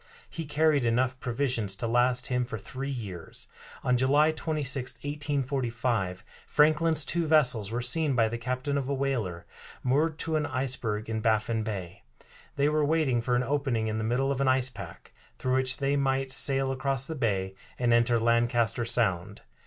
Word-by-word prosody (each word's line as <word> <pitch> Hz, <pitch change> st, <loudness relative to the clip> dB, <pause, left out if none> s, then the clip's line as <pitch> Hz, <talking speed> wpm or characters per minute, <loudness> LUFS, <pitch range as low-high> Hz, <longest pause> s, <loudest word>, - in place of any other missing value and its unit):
He 165 Hz, -, -5 dB
carried 150 Hz, -1 st, +2 dB
enough 125 Hz, +2 st, +1 dB
provisions 120 Hz, -6 st, -1 dB
to 100 Hz, -, -4 dB
last 120 Hz, +2 st, +2 dB
him 125 Hz, -1 st, +1 dB
for 120 Hz, -2 st, -5 dB
three 135 Hz, +6 st, -6 dB
years. 100 Hz, -11 st, -7 dB, 0.4 s
On 125 Hz, -1 st, +2 dB
July 145 Hz, +5 st, +4 dB
26, 145 Hz, -5 st, -2 dB
1845, 125 Hz, -9 st, -2 dB, 0.2 s
Franklin's 155 Hz, 0 st, +3 dB
two 170 Hz, +1 st, 0 dB
vessels 125 Hz, -10 st, +4 dB
were 120 Hz, +2 st, -2 dB
seen 140 Hz, +3 st, +1 dB
by 115 Hz, -2 st, +3 dB
the 115 Hz, +1 st, -4 dB
captain 130 Hz, +4 st, -2 dB
of 135 Hz, -1 st, -4 dB
a 140 Hz, -, 0 dB
whaler, 115 Hz, -11 st, -2 dB, 0.4 s
moored 150 Hz, +5 st, +1 dB
to 160 Hz, -1 st, -1 dB
an 150 Hz, -1 st, -1 dB
iceberg 125 Hz, -5 st, -2 dB
in 110 Hz, -1 st, -2 dB
Baffin 110 Hz, 0 st, +1 dB
Bay. 100 Hz, -4 st, -5 dB, 0.5 s
They 140 Hz, 0 st, +2 dB
were 150 Hz, 0 st, +2 dB
waiting 145 Hz, -5 st, +1 dB
for 125 Hz, +1 st, 0 dB
an 125 Hz, -, +1 dB
opening 135 Hz, -5 st, -1 dB
in 110 Hz, 0 st, -2 dB
the -, -, -2 dB
middle 125 Hz, +5 st, 0 dB
of 135 Hz, -1 st, -1 dB
an 135 Hz, -, +2 dB
ice 130 Hz, 0 st, +2 dB
pack, 95 Hz, -7 st, -11 dB, 0.2 s
through 130 Hz, -, -1 dB
which 130 Hz, 0 st, +1 dB
they 140 Hz, 0 st, 0 dB
might 135 Hz, -1 st, 0 dB
sail 135 Hz, 0 st, +1 dB
across 135 Hz, 0 st, 0 dB
the 160 Hz, -, -4 dB
bay 100 Hz, -9 st, -1 dB, 0.2 s
and 120 Hz, -1 st, +2 dB
enter 120 Hz, 0 st, +3 dB
Lancaster 115 Hz, 0 st, +1 dB
Sound. 100 Hz, -5 st, 0 dB
130 Hz, 175 wpm, -28 LUFS, 115-140 Hz, 0.5 s, July